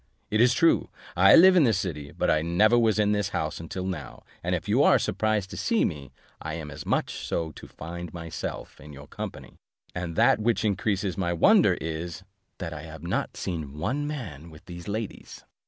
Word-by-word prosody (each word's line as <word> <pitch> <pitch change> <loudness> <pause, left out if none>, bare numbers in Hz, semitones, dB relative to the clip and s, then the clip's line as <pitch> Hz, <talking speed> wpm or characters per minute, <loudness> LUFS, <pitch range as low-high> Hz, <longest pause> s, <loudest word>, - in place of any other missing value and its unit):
It 110 +1 +3
is 125 +1 +5
true, 165 +5 +3 0.3
I 95 +2 +7
live 185 +2 +8
in 175 - +6
this 115 -7 +3
city, 75 -7 -4
but - - 0
I 75 - +2
never 90 +8 +3
was 110 -3 +3
in 105 -1 +3
the 105 -1 +2
house 80 -1 -2
until 90 +3 -5
now, 75 -10 -6 0.2
and - - 0
if - - -5
you - - +3
are - - +6
surprised 110 -3 -1
to - - -7
see 230 -3 +1
me 70 -5 -5 0.3
I 80 0 -4
am 75 -2 -7
as 70 - -9
much - - -1
so 80 -1 -2
to - - -12
find 85 +1 -8
myself 85 -1 -6
in 75 +1 -11
your 70 +1 -11
company; - - -8 0.4
and 90 -2 -4
that - - +4
which 115 +1 +1
increases 100 -1 -1
my 85 -2 0
wonder 85 - +5
is, 80 +3 -5 0.3
that 80 -3 -5
I 75 - -7
have 80 0 -10
not 85 - -2
seen 80 -6 -5
one 140 - -2
man 90 - -6
with 75 -1 -15
these 85 -1 -9
ladies." 110 +1 -6
85 Hz, 205 wpm, -26 LUFS, 80-105 Hz, 0.4 s, live